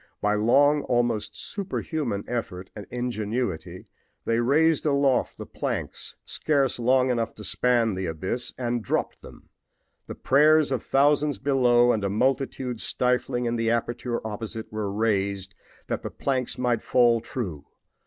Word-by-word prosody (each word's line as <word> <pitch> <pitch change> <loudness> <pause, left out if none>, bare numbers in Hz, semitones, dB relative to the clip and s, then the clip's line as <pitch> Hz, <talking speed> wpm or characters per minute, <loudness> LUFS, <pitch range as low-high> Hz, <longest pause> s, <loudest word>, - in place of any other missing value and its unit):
By 105 +1 +1
almost 120 -1 +2
superhuman 155 - -3
effort 95 -6 -4
and 105 -2 -8
ingenuity 110 -6 -3 0.4
they 115 0 +1
raised 150 +6 +3
aloft 140 -3 +1
the - - -7
planks, - - -4
scarce 140 -5 0
long 130 +2 +3
enough 115 -2 -2
to 105 - -10
span 115 +2 +2
the 95 -1 -3
abyss, 95 +10 -3
and 120 -2 -2
dropped - - -2
them. - - -14 0.6
The - - -6
prayers 150 +2 +4
of 130 -4 0
thousands 145 +1 +2
below 125 -3 +3
and 110 -3 -1
a 100 - 0
multitude 125 +1 -1
stifling 125 0 0
in 120 0 -1
the 115 0 0
aperture 120 0 -2
opposite 110 0 -6
were 105 -2 -2
raised 100 -2 -1 0.3
that - - -3
the - - -5
planks 130 -3 -2
might 120 -3 0
fall 120 -2 +3
true. 90 - -6
120 Hz, 140 wpm, -25 LUFS, 110-130 Hz, 0.6 s, prayers